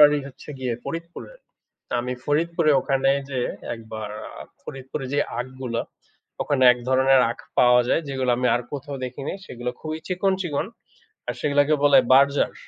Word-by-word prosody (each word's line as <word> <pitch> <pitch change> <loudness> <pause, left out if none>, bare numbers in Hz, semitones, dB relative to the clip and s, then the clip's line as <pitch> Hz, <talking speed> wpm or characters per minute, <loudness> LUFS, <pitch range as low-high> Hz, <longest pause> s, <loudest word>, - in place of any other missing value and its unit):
বাড়ি 150 0 +7
হচ্ছে 140 - -13
গিয়ে 125 -2 -2
ফরিদপুরে। 170 - -7 0.6
তো - - -8
আমি 125 +1 -3
ফরিদপুরে 165 +2 +1
ওখানে 135 0 +1 0.2
যে 130 -2 -1 0.3
একবার 110 -2 -7 0.2
আ - - -10 0.2
ফরিদপুরে 135 0 -6
যে 145 - +2 0.2
আখগুলা, 130 -2 -4 0.6
ওখানে 140 -3 0
এক 125 - -6
ধরনের 130 0 +5
আখ - - -19 0.2
পাওয়া 125 0 +6
যায় 165 - +2
যেগুলা 130 -2 0
আমি 125 - +1
আর 120 - 0
কোথাও 145 0 -5
দেখি 125 +2 -6
নাই, - - -3
সেগুলা 125 0 -4
খুবই 155 0 -4
চিকন, 190 +1 +1
চিকন, 155 0 -2 0.6
আর - - -2
সেগুলাকে 145 +1 +3
বলে 145 - +7
বার্জার। 140 +2 +4
135 Hz, 160 wpm, -24 LUFS, 125-150 Hz, 0.6 s, বাড়ি